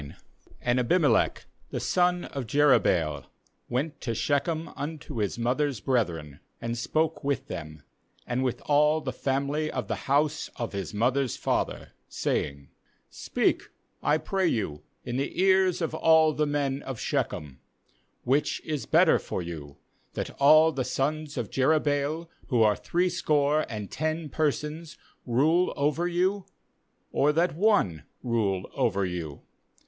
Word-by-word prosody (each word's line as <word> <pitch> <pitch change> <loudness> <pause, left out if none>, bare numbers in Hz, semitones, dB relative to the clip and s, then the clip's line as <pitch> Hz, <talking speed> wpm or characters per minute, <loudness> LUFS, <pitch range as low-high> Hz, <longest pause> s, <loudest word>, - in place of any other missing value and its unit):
Q 70 - -10 0.5
And 125 +1 +2
Abimelech 135 -1 +2 0.2
the - - -3
son 180 -1 +1
of 135 -4 -5
Jerub 145 +3 +4
baal 75 -6 0 0.4
went 145 +6 -2
to 115 -2 -2
Shechem 155 +6 0
unto 150 -2 -6
his 105 0 -1
mother's 130 +2 0
brethren, 85 - -1 0.2
and 115 0 -3
spoke 155 +7 -1
with 140 -1 -1
them, 75 - -8 0.4
and 125 +2 -1
with 125 -2 -2
all 150 +1 +4
the 130 -4 -4
family 140 +3 -1
of - - -3
the - - -5
house 145 +2 +1
of 115 -3 -4
his 95 -5 -4
mother's 125 +4 0
father, - - -2 0.2
saying: 70 -1 -2 0.4
2f - - -28
Speak, - - 0 0.4
I 150 - +3
pray 190 +3 0
you, 95 - -1 0.2
in 120 0 -3
the 140 +5 -3
ears 190 -2 +3
of 160 - -2
all 160 -1 +4
the 150 0 0
men 140 -1 -1
of 130 -4 -6
Shechem: 70 -3 -2 0.6
Which 135 +4 +1
is 150 -3 -3
better - - +5
for 90 - -4
you, 75 -5 -8 0.4
that - - -4
all 155 +3 +7
the 135 -4 -2
sons 150 +3 -2
of 120 -4 -3
Jerubbaal, 150 +3 +1 0.2
who 120 -5 +3
are 105 -1 +4
threescore 155 -4 +1
and 105 -4 -6
ten 155 +1 -2
persons, 155 +2 -2 0.3
rule 155 +9 +3
over 150 +5 +1
you, 185 +3 0 0.6
or 145 +2 +3
that 170 +2 +2
one 180 - +2 0.2
rule 105 -6 0
over 100 -3 +1
you? 85 -5 -5
140 Hz, 145 wpm, -27 LUFS, 115-155 Hz, 0.6 s, all